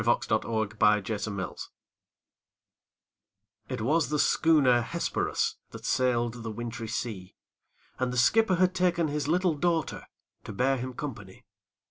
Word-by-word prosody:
THE -, -, -7 dB
WRECK -, -, -2 dB
OF 110 Hz, -1 st, -1 dB
THE 105 Hz, -1 st, +4 dB
HESPERUS 105 Hz, -3 st, -4 dB, 2.0 s
It -, -, -4 dB
was 150 Hz, +5 st, +1 dB
the 150 Hz, -, 0 dB
schooner 145 Hz, -6 st, +4 dB
Hesperus, 170 Hz, +9 st, -1 dB
That -, -, -10 dB
sailed 120 Hz, -2 st, 0 dB
the 115 Hz, -, -5 dB
wintry 115 Hz, +1 st, -5 dB
sea; 110 Hz, -5 st, -5 dB, 0.6 s
And 130 Hz, -1 st, 0 dB
the 125 Hz, -, -4 dB
skipper 205 Hz, -, +4 dB
had 185 Hz, +1 st, +2 dB
taken 175 Hz, -3 st, +1 dB
his 145 Hz, 0 st, -2 dB
little 175 Hz, +2 st, +2 dB
daughter, 165 Hz, +1 st, -1 dB, 0.4 s
To -, -, -6 dB
bear 135 Hz, +2 st, +1 dB
him 130 Hz, +1 st, -5 dB
company. 115 Hz, -5 st, -8 dB
125 Hz, 135 wpm, -28 LUFS, 115-160 Hz, 2.0 s, THE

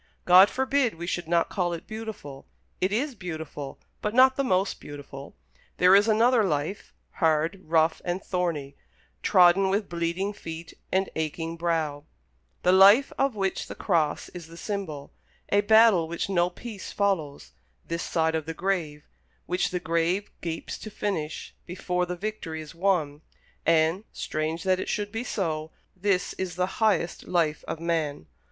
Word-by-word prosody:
God 185 Hz, +3 st, +8 dB
forbid 265 Hz, -3 st, +1 dB
we 170 Hz, +1 st, -6 dB
should 175 Hz, -1 st, -3 dB
not 170 Hz, 0 st, +1 dB
call 175 Hz, -3 st, 0 dB
it 165 Hz, -, -6 dB
beautiful. 215 Hz, -11 st, -8 dB, 0.3 s
It 185 Hz, +1 st, +1 dB
is 265 Hz, +7 st, 0 dB
beautiful, 160 Hz, -, -7 dB, 0.2 s
but 210 Hz, +2 st, -2 dB
not 260 Hz, +1 st, +7 dB
the 275 Hz, -, 0 dB
most 195 Hz, -6 st, +1 dB
beautiful. 140 Hz, -1 st, -10 dB, 0.4 s
There 180 Hz, +1 st, +6 dB
is 205 Hz, +2 st, +5 dB
another 230 Hz, +2 st, +4 dB
life, 160 Hz, +2 st, -2 dB, 0.2 s
hard, 160 Hz, +3 st, +1 dB
rough, 160 Hz, 0 st, +2 dB
and 175 Hz, +1 st, -2 dB
thorny, 165 Hz, -7 st, -2 dB, 0.5 s
trodden 185 Hz, +2 st, +5 dB
with 200 Hz, +2 st, 0 dB
bleeding 170 Hz, +4 st, -2 dB
feet 165 Hz, -3 st, -8 dB, 0.2 s
and 190 Hz, 0 st, +2 dB
aching 160 Hz, +1 st, -3 dB
brow; 160 Hz, -4 st, -1 dB, 0.6 s
the 180 Hz, -, +5 dB
life 200 Hz, +8 st, +7 dB
of 270 Hz, -3 st, +2 dB
which 195 Hz, -2 st, -2 dB
the -, -, -7 dB
cross 165 Hz, -6 st, 0 dB
is 175 Hz, -3 st, -9 dB
the 165 Hz, +1 st, -13 dB
symbol; 170 Hz, -8 st, -5 dB, 0.4 s
a 205 Hz, -, +4 dB
battle 220 Hz, -5 st, +5 dB
which 170 Hz, +3 st, -3 dB
no 175 Hz, -2 st, +2 dB
peace 210 Hz, +2 st, -8 dB
follows, 160 Hz, -, -1 dB, 0.4 s
this 170 Hz, +1 st, -2 dB
side 160 Hz, -1 st, 0 dB
the 160 Hz, 0 st, -3 dB
grave; 165 Hz, -6 st, -2 dB, 0.4 s
which 180 Hz, +1 st, 0 dB
the 180 Hz, -, -2 dB
grave 170 Hz, +4 st, 0 dB
gapes 165 Hz, -1 st, -5 dB
to 215 Hz, -, -7 dB
finish, 180 Hz, -7 st, -4 dB
before 180 Hz, 0 st, -2 dB
the 180 Hz, -, -3 dB
victory 180 Hz, -5 st, -5 dB
is 155 Hz, -1 st, -9 dB
won; 165 Hz, -5 st, 0 dB, 0.5 s
and 165 Hz, +4 st, +3 dB
strange 155 Hz, +3 st, -3 dB
that 185 Hz, -1 st, +2 dB
it -, -, -4 dB
should 205 Hz, -1 st, -2 dB
be 225 Hz, +3 st, -3 dB
so 160 Hz, -9 st, -2 dB, 0.3 s
this 190 Hz, -1 st, 0 dB
is 185 Hz, -3 st, -3 dB
the 180 Hz, +4 st, -2 dB
highest 190 Hz, -6 st, +1 dB
life 160 Hz, -4 st, +1 dB
of -, -, -4 dB
man. 160 Hz, -, -1 dB
175 Hz, 160 wpm, -26 LUFS, 160-200 Hz, 0.6 s, God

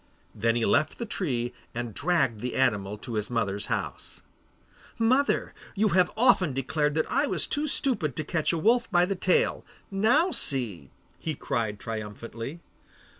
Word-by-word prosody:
Then 115 Hz, +2 st, +1 dB
he 120 Hz, -, +1 dB
left 155 Hz, -, +2 dB
the 235 Hz, -, -4 dB
tree 125 Hz, -, -2 dB, 0.2 s
and 120 Hz, -2 st, -4 dB
dragged 140 Hz, -, +1 dB
the 125 Hz, 0 st, -3 dB
animal 105 Hz, -5 st, +1 dB
to 120 Hz, +3 st, -8 dB
his 105 Hz, -1 st, -2 dB
mother's 105 Hz, -4 st, -1 dB
house. -, -, -4 dB, 0.7 s
'Mother, 255 Hz, +5 st, +2 dB, 0.2 s
you 210 Hz, +1 st, +3 dB
have 180 Hz, -1 st, +3 dB
often 220 Hz, -, +4 dB
declared 150 Hz, +3 st, 0 dB
that 160 Hz, -, +2 dB
I 280 Hz, +2 st, +1 dB
was -, -, +1 dB
too 295 Hz, +1 st, -1 dB
stupid 210 Hz, -, 0 dB
to 155 Hz, -, -2 dB
catch 160 Hz, -2 st, 0 dB
a 170 Hz, -, -1 dB
wolf 230 Hz, +7 st, +3 dB
by 175 Hz, -3 st, +4 dB
the 195 Hz, -, -1 dB
tail. 185 Hz, -1 st, +1 dB, 0.3 s
Now 240 Hz, -, +3 dB
see,' 115 Hz, -, 0 dB, 0.3 s
he 160 Hz, -2 st, -3 dB
cried 110 Hz, -5 st, -2 dB
triumphantly. 115 Hz, +6 st, -6 dB
150 Hz, 160 wpm, -27 LUFS, -, 0.7 s, often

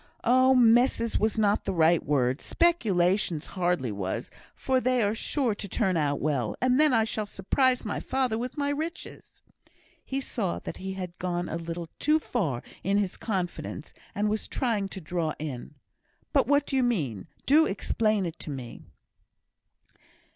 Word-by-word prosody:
"Oh! 255 Hz, +2 st, +5 dB
messes 235 Hz, -1 st, +4 dB
was 220 Hz, +1 st, 0 dB
not 210 Hz, -1 st, +2 dB
the -, -, -2 dB
right 165 Hz, 0 st, +4 dB
word. 130 Hz, -1 st, +1 dB
Speculations 195 Hz, -, +1 dB
hardly 175 Hz, -, -1 dB
was; 95 Hz, -2 st, -4 dB, 0.2 s
for 260 Hz, -1 st, 0 dB
they 255 Hz, -2 st, +2 dB
are 205 Hz, +1 st, +1 dB
sure 240 Hz, +1 st, 0 dB
to 205 Hz, -, -6 dB
turn 190 Hz, -2 st, +1 dB
out 145 Hz, -3 st, +1 dB
well, 135 Hz, -6 st, -1 dB
and 255 Hz, +2 st, +3 dB
then 305 Hz, -1 st, +5 dB
I 225 Hz, -3 st, +4 dB
shall 215 Hz, -1 st, -3 dB
surprise 250 Hz, +6 st, +1 dB
my 210 Hz, -, -2 dB
father 260 Hz, -3 st, 0 dB
with 245 Hz, +5 st, -4 dB
my 285 Hz, -1 st, 0 dB
riches." 320 Hz, +4 st, -6 dB, 0.6 s
He 270 Hz, -, -3 dB
saw 215 Hz, -9 st, -2 dB
that -, -, -7 dB
he 190 Hz, 0 st, -5 dB
had 180 Hz, -2 st, -6 dB
gone 175 Hz, -1 st, -2 dB
a -, -, -4 dB
little 170 Hz, 0 st, -5 dB
too 305 Hz, +1 st, +4 dB
far 175 Hz, -, -2 dB, 0.2 s
in 200 Hz, +1 st, +2 dB
his 200 Hz, -2 st, 0 dB
confidence, 180 Hz, -6 st, -4 dB, 0.2 s
and 205 Hz, +1 st, +1 dB
was 215 Hz, 0 st, -1 dB
trying 225 Hz, -6 st, -1 dB
to 190 Hz, -, -7 dB
draw 160 Hz, -1 st, -2 dB
in. 150 Hz, -2 st, -6 dB, 0.6 s
"But, -, -, +3 dB
what 285 Hz, 0 st, +3 dB
do 275 Hz, -, -3 dB
you 265 Hz, -, +3 dB
mean? 150 Hz, -, -1 dB, 0.2 s
Do 310 Hz, +4 st, +5 dB
explain 210 Hz, 0 st, 0 dB
it 170 Hz, -1 st, -6 dB
to -, -, -7 dB
me." 130 Hz, -4 st, -7 dB
205 Hz, 170 wpm, -27 LUFS, 170-250 Hz, 0.6 s, Oh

